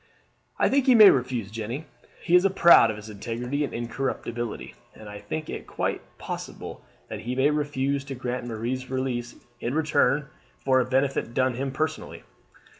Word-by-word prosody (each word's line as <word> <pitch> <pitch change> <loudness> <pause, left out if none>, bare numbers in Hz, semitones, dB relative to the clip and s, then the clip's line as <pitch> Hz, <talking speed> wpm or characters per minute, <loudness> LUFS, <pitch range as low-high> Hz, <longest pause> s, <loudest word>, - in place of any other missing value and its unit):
"I - - +3
think 275 0 +2
he 255 - +7
may 215 -3 +10
refuse, 125 -5 -2
Jeanne. 115 +7 -5 0.4
He 170 - -1
is 180 +2 +6
proud 170 -11 +7
of 110 - -3
his 105 0 -10
integrity 120 +7 -3
and 145 - -3
incorruptibility, 120 -1 -4 0.2
and 110 - -12
I 105 0 -8
think 155 +10 -5
it - - -6
quite - - -2 0.2
possible - - -7 0.2
that - - -6
he 125 +3 -4
may 135 +3 +3
refuse 140 -2 -1
to 135 -1 -6
grant 125 -1 -4
Marie's 120 +3 -4
release 130 -2 -3 0.2
in 120 +4 -3
return 150 -3 +2 0.3
for 130 -1 +2
a 125 - +1
benefit 130 -2 0
done 130 -1 +2
him 135 +3 -3
personally. 155 +3 -4
130 Hz, 170 wpm, -26 LUFS, 120-140 Hz, 0.4 s, may